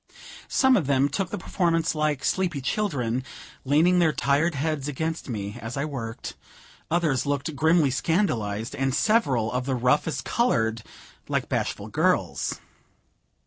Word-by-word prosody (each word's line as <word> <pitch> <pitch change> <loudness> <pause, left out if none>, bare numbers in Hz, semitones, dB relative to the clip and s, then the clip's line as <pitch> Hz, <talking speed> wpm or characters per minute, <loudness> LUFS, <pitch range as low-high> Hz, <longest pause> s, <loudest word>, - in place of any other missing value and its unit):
Some 265 -1 +4
of 160 -9 -1
them 140 0 +3
took 190 +4 -2
the - - -4
performance 165 -2 0
like 150 -3 -1
sleepy 180 -6 0
children, 130 - -1 0.4
leaning 160 +7 +4
their 165 -3 +4
tired 145 +4 +1
heads 145 0 -2
against 160 +2 -3
me 105 -3 -4
as 115 +4 -6
I 140 - 0
worked, 115 -7 -5 0.6
others 155 -6 +1
looked 145 +2 -2
grimly 160 0 +3
scandalized, 120 - 0
and 135 -1 0
several 135 - +2
of 125 +1 -2
the 135 - 0
roughest 125 +6 +1
colored 115 - +1 0.5
like - - -1
bashful - - -2
girls. - - 0
145 Hz, 140 wpm, -25 LUFS, 125-165 Hz, 0.6 s, Some